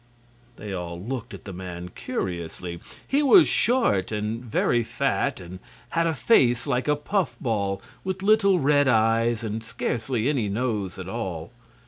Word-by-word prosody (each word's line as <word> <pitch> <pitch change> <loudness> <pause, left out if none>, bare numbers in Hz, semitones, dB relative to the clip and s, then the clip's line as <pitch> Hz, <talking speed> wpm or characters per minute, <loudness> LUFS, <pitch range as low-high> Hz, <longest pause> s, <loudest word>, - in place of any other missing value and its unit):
They 105 -3 -7
all 85 -2 -5
looked 120 +5 -5
at - - -10
the 100 - -7
man 90 -1 -7
curiously. 85 -1 -4 0.3
He 280 +2 +2
was 325 +5 +7
short 225 - +2
and 110 +2 -3
very 120 0 +1
fat, 135 +3 -1
and 90 0 -9 0.3
had 165 0 +1
a 165 - 0
face 125 - +3
like 125 +3 -1
a 150 - +3
puff 185 +5 -1
ball, 100 -6 -1 0.2
with 190 0 -3
little 200 -2 +4
red 145 -2 +3
eyes 115 0 +2
and 110 0 -3
scarcely 115 +1 -2
any 130 -8 0
nose 105 -3 -2
at 95 -1 -7
all. 95 -6 -4
115 Hz, 155 wpm, -25 LUFS, 95-145 Hz, 0.3 s, was